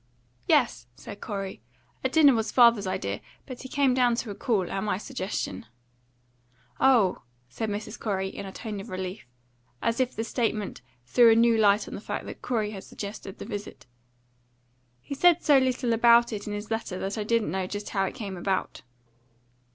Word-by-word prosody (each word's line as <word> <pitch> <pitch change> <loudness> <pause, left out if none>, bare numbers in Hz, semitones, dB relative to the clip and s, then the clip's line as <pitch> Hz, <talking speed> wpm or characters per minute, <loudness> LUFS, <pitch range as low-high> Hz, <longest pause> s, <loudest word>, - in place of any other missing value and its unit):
"Yes," 120 0 +2
said 200 - -10
Corey. 195 - -5 0.4
"A 260 - +1
dinner 290 -1 +6
was 225 -2 -1
father's 235 -5 +5
idea, 100 - -3 0.2
but 255 -2 -8
he 260 - -8
came 275 -2 +2
down 245 -2 +3
to 230 -2 -4
a - - -4
call, 200 -3 0
at 195 - -3
my 205 -3 0
suggestion." 190 - -4 1.1
"Oh," 240 -9 +4 0.3
said 220 - -3
Mrs. 205 +1 -5
Corey, 190 -3 -1
in 190 - -7
a - - -7
tone 210 0 -6
of 195 - -9
relief, 185 - -5 0.5
as 230 - -1
if 255 -1 0
the 225 - -2
statement 225 - -2 0.2
threw 230 - +6
a - - +5
new 230 0 +5
light 210 -1 +3
on - - -8
the - - -6
fact - - -4
that - - -9
Corey 220 -4 -1
had 195 -3 -8
suggested 200 -1 -8
the - - -7
visit. 205 0 -7 1.2
"He 280 - -7
said 345 +4 +4
so 285 -3 +6
little 255 -2 0
about 235 +1 +5
it 205 -1 -5
in 210 - -3
his 205 +1 -6
letter 225 -4 -2
that 195 +1 -3
I - - -1
didn't 230 0 +1
know 190 -1 -2
just 205 +2 -5
how 195 -1 0
it - - -5
came 205 -6 -5
about." 190 +1 -2
215 Hz, 190 wpm, -27 LUFS, 195-235 Hz, 1.2 s, dinner